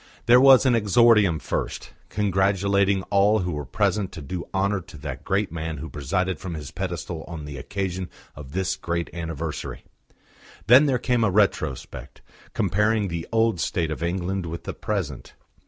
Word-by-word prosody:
There 120 +2 +7
was 135 -1 +7
an 130 - +4
exordium 105 -4 +4
first, - - -4 0.2
congratulating 100 -1 +1
all 100 +2 +4
who 90 0 -2
were 75 -2 -4
present 95 - 0
to 80 - -7
do 85 +5 -5
honour 100 0 0
to 80 - -13
the 70 - -6
great 100 -2 0
man 80 -1 -4
who 80 +3 -7
presided 90 +5 -2
from 90 -3 -5
his 75 -3 -7
pedestal 85 -3 -4
on 80 -3 -7
the 70 -1 -7
occasion 95 +2 -4 0.3
of 70 -1 -10
this 95 0 -1
great 85 0 -3
anniversary. 80 -2 -5 0.8
Then 130 +7 +7
there 130 -2 +2
came 120 -1 +1
a 110 - +3
retrospect, 90 - -1 0.3
comparing 105 0 +1
the 85 -1 -4
old 115 -4 +2
state 80 -1 -1
of 75 - -5
England 90 +1 -2
with 85 +1 -6
the - - -5
present. 90 - -4
95 Hz, 165 wpm, -24 LUFS, 80-105 Hz, 0.8 s, There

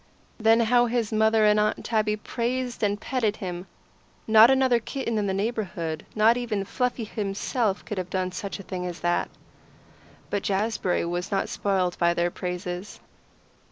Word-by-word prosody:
Then 225 +1 +5
how 240 +1 +4
his 230 -2 -1
mother 220 0 +4
and 210 0 +4
Aunt 210 0 0
Tabby 215 -2 +1
praised 245 +3 -3
and 205 -1 +1
petted 225 -3 -1
him! 180 -1 -6 0.6
Not 220 +1 +7
another 260 -2 +4
kitten 235 -2 -3
in 205 - -1
the - - 0
neighbourhood, 195 -7 -3
not 220 +2 +5
even 220 -5 -2
Fluffy 250 +2 -1
himself, 210 +1 -2
could 210 - -4
have 180 -1 -4
done 185 0 -1
such 200 +2 -5
a - - -8
thing 180 -1 -4
as 175 0 -7
that. 175 0 0 1.0
But 205 - 0
Jazbury 200 -3 0
was 175 +3 -3
not 195 -1 0
spoiled 185 -3 -1
by 170 0 +3
their 175 +1 +1
praises. 180 +2 -5
210 Hz, 160 wpm, -26 LUFS, 185-230 Hz, 1.0 s, Not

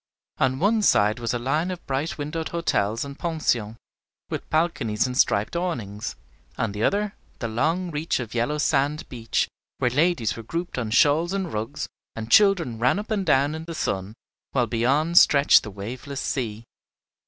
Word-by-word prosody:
On 130 0 +2
one 210 +8 +2
side 105 - +3
was 115 -1 -2
a 120 - 0
line 150 +8 0
of 180 -1 -6
bright 140 +5 -2
windowed 155 +2 -3
hotels 115 -9 0
and 140 0 -9
pensions, 120 -10 -1 0.5
with - - -5
balconies 155 -10 +1
and 125 -1 -3
striped 105 +1 +2
awnings; 115 - -3 0.4
on 115 - -1
the 105 +2 -3
other, 205 - +1 0.2
the 115 - -3
long 160 +11 0
reach 150 0 -1
of 120 -4 -6
yellow 120 +6 0
sand 145 0 +1
beach, 115 -3 -1 0.3
where 125 - +1
ladies 145 - +1
were 115 - -7
grouped 165 +5 -4
on 115 -3 -3
shawls 150 - +3
and 190 -4 -2
rugs, 110 +7 -3 0.3
and 115 0 -6
children 175 - +4
ran 125 +10 +3
up 210 +2 -5
and 200 -4 -1
down 140 0 +3
in 160 +1 -6
the 165 -1 -6
sun, 100 - -2 0.4
while 125 -3 +2
beyond 135 +9 +3
stretched 140 0 +6
the 105 - -8
waveless 120 +8 -6
sea. 115 -4 -3
140 Hz, 175 wpm, -24 LUFS, 115-165 Hz, 0.5 s, stretched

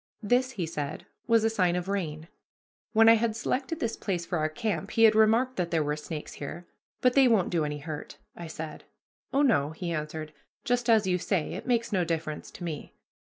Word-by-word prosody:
This, 250 +4 +2
he 185 -7 -2
said, 150 -2 -5 0.2
was 230 -1 +4
a 225 - +3
sign 180 -5 +2
of 180 0 -2
rain. 165 -6 -3 0.6
When 225 0 +6
I 225 - +10
had 225 -1 +1
selected 265 +7 -2
this 230 -4 -1
place 180 -4 -3
for 175 -1 -2
our 155 0 +1
camp 175 -1 -2
he 225 - +2
had 220 -1 +8
remarked 225 +4 +3
that 175 -2 0
there 165 -2 +1
were 150 0 -1
snakes 150 0 -7
there. 170 +5 -6 0.4
"But 250 -1 +4
they 270 -1 +6
won't 220 -7 +3
do 170 -3 +1
any 150 0 -3
hurt," 150 0 -7 0.2
I 170 - -7
said. 160 0 -7 0.5
"Oh, 280 +2 +3
no," 150 - +3
he 170 +1 -4
answered, 155 0 -4 0.3
"just 245 -2 0
as 220 -3 +5
you 180 -1 +1
say; 180 -3 -1
it - - -7
makes 235 -1 +1
no 185 -3 +2
difference 160 -2 -3
to - - -10
me." 160 -4 -6
180 Hz, 215 wpm, -28 LUFS, 155-230 Hz, 0.6 s, I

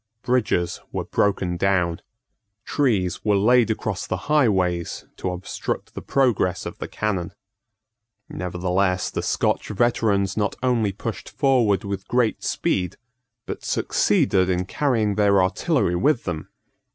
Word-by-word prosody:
Bridges 105 -8 0
were - - -2
broken 95 -3 0
down. 90 -3 +1 0.6
Trees 110 -11 0
were 105 -1 +3
laid 120 +3 +4
across 110 -3 -2
the 90 - -1
highways 95 - +1
to 95 - -2
obstruct 90 +1 -4
the - - -6
progress 110 -9 +1
of - - -7
the - - -4
cannon. 95 -5 -2 0.9
Nevertheless 90 +1 -1
the - - -2
Scotch - - 0
veterans 105 -3 +1
not 105 -1 0
only 120 -5 +2
pushed 110 +3 -6
forward 120 - +2
with 100 -1 -5
great 120 -2 +1
speed, 90 -2 -1 0.5
but - - -6
succeeded 95 -1 +2
in 90 0 0
carrying 110 -2 +1
their 100 -1 +4
artillery 95 - +1
with 130 +6 +2
them. 80 -4 -4
100 Hz, 125 wpm, -23 LUFS, 90-115 Hz, 0.9 s, laid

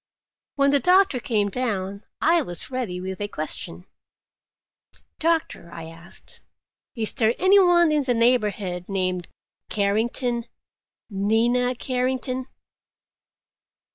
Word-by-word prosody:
When 280 -1 +3
the 285 - +4
doctor 365 -4 +4
came 215 -5 0
down, 200 -4 -2 0.2
I 335 +1 +4
was 175 - -5
ready 235 -9 -3
with 190 +2 -6
a 205 - -1
question. 170 0 -4 1.3
"Doctor," 315 - 0
I 165 - -8
asked, 165 +2 -11 0.5
"is 225 -3 -1
there 225 +1 +2
any 380 +2 +5
one 345 -3 +5
in 300 -1 +2
the 245 -2 +1
neighborhood 210 -7 +1
named 185 -2 -1 0.4
Carrington? 230 +4 0 0.7
Nina 235 +5 +1
Carrington?" 255 +1 -2
230 Hz, 110 wpm, -24 LUFS, 195-260 Hz, 1.3 s, any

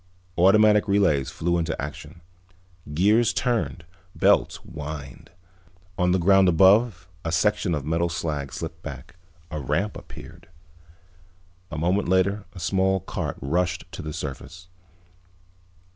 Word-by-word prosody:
Automatic 105 +4 +5
relays 95 -9 +2
flew 85 +1 -1
into 80 0 -2
action. 75 +4 -7 0.7
Gears 105 +8 +3
turned, 115 -9 -1 0.3
belts - - +3
whined. 75 -3 -8 0.7
On 90 0 +1
the 95 - +3
ground 95 +1 +5
above 95 +2 +4 0.2
a 80 - -2
section 100 -1 +1
of 70 -2 -4
metal 85 +2 0
slag 75 -4 -3
slipped - - -7
back. - - -9 0.4
A 75 - -3
ramp 75 +10 -1
appeared. - - -12 1.2
A 75 - -6
moment 90 +5 0
later 95 +2 +1
a 95 - -10
small 95 +2 +1
cart - - -4
rushed 90 +5 -1
to - - -7
the 75 - -6
surface. 85 +6 -7
90 Hz, 125 wpm, -24 LUFS, 80-100 Hz, 1.2 s, Automatic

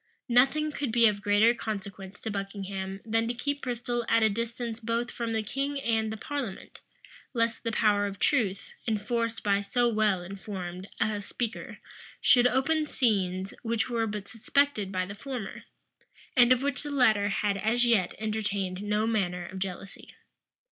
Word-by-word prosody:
Nothing 275 +6 +4
could 285 -4 -2
be 235 0 +6
of 205 -1 0
greater 205 +3 +5
consequence 200 -4 -6
to 220 - -3
Buckingham 195 -1 -4
than 225 0 +1
to 240 - -2
keep 285 +3 -2
Bristol 240 -1 -2
at 230 - +4
a 220 - +4
distance 230 +1 -3
both 230 +1 -1
from 235 -1 -3
the 220 -1 0
king 275 +6 -2
and 225 -4 0
the 220 - -4
parliament; 255 -5 -5 0.6
lest 230 -1 0
the 230 - -1
power 205 -2 +3
of 200 0 -6
truth, 200 -9 +1 0.2
enforced 230 +1 -1
by 200 -1 +2
so 240 +4 +1
well 215 -5 +2
informed 190 -1 -6
a 210 -1 0
speaker, 235 +3 -5 0.4
should 245 -1 +6
open 300 +5 +1
scenes 190 -7 0
which 230 +1 -1
were 230 -1 +1
but 205 -1 -5
suspected 225 -2 +1
by 185 -1 0
the 200 - -7
former, 235 -2 -6 0.7
and 245 -1 +6
of 255 +1 +4
which 280 -2 0
the 295 - -5
latter 220 -7 +3
had 205 0 0
as 225 +5 +2
yet 215 -7 +2
entertained 205 -3 -2
no 210 +1 +1
manner 180 -6 0
of 190 +2 -7
jealousy. 195 +1 -6
220 Hz, 165 wpm, -28 LUFS, 200-240 Hz, 0.7 s, be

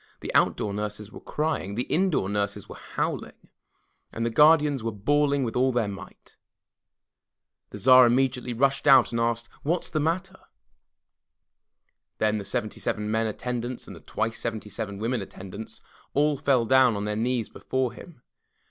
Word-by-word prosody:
The - - -5
outdoor 105 - +2
nurses 105 0 -5
were - - -10
crying; 150 -10 -2
the 120 - -1
indoor 170 - +1
nurses 100 0 -2
were - - -9
howling, - - -4 0.7
and 115 - -3
the 115 - -1
guardians 150 -1 +5
were 115 - -1
bawling 140 +6 +1
with 115 - -3
all 130 +1 +3
their 120 -4 0
might. 100 -1 -10 1.3
The - - -8
Tsar 130 0 +7
immediately 125 0 +1
rushed 135 +4 +1
out 135 -1 +7
and 115 0 -1
asked, 115 0 -1
"What 170 +5 -1
is - - -10
the 155 - 0
matter?" 185 +5 -2 1.8
Then 110 0 +1
the 100 - -6
seventy 110 -1 -3
seven 105 0 -2
men 110 0 +1
attendants 120 +2 -4
and - - -10
the - - -12
twice 115 +1 -3
seventy 110 -2 -4
seven 100 -3 -5
women 115 +2 -1
attendants 95 +2 -9 0.3
all 150 +1 +3
fell 135 -4 +2
down 130 -1 +5
on 100 0 -3
their 105 0 -2
knees 115 0 -1
before 130 -2 -2
him. 160 -9 -14
120 Hz, 165 wpm, -26 LUFS, 105-135 Hz, 1.8 s, Tsar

